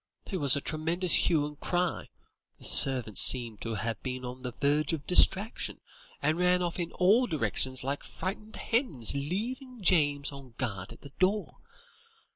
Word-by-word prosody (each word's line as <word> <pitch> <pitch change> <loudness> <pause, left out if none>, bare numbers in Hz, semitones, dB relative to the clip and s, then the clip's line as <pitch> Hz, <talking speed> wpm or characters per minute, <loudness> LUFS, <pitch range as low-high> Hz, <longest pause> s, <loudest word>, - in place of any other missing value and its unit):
There 190 - -3
was 140 -4 +2
a 140 - -3
tremendous 165 +4 -2 0.2
hue 155 -4 +1
and 150 0 -10
cry; 180 0 -3 0.5
the - - -11
servants 125 -6 +7
seem 120 -4 +4
to 115 +1 -6
have 110 +2 -5
been 130 -1 -6
on 125 +1 -9
the 125 - -6
verge 145 +4 -1
of 150 -3 -5
distraction, 195 +4 +2 0.4
and 155 +4 0
ran 180 0 +1
off 175 +1 -4
in 170 -1 -4
all 215 +8 +2
directions 130 - -1
like 140 +2 -4
frightened 210 +3 -7
hens, 225 - -2
leaving 225 - -5
James 145 -6 +1
on 135 -4 -13
guard 100 -8 -5
at - - -14
the 140 - -13
door. 200 +3 -1
150 Hz, 165 wpm, -28 LUFS, 130-180 Hz, 0.5 s, servants